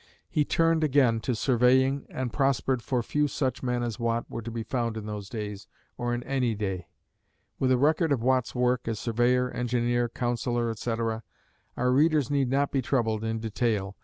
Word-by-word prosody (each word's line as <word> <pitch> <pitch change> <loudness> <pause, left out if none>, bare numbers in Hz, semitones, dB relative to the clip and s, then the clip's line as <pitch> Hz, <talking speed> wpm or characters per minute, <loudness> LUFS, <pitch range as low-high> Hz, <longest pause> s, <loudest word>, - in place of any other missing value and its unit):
He 150 - +2
turned 165 +1 +2
again 130 -6 +3
to 125 +2 -1
surveying 130 +3 +3
and 125 -3 -4
prospered, 135 -2 +1
for 125 -1 -1
few 150 +5 +1
such 130 -3 -2
men 125 -1 -1
as 115 -3 -3
Watt 115 0 0
were 115 - -4
to 115 - -6
be 115 0 -4
found 115 -1 -2
in 110 - -5
those 105 -2 -6
days, 105 -3 -6 0.3
or 120 -1 -2
in 120 0 -2
any 130 -4 0
day. 95 -4 -3 0.7
With 130 -1 +2
a 130 - +4
record 155 +4 +2
of 125 -5 +1
Watt's 130 -1 +1
work 125 -1 +1
as 115 -2 -1
surveyor, 125 +3 +1
engineer, 120 0 0
councillor, 120 0 -1
etc., 115 0 -2 0.6
our 125 0 +2
readers 150 0 +3
need 140 -3 +1
not 140 +2 +1
be 135 - +1
troubled 115 -4 0
in 110 0 -1
detail. 110 -3 -1
120 Hz, 185 wpm, -27 LUFS, 115-130 Hz, 0.7 s, a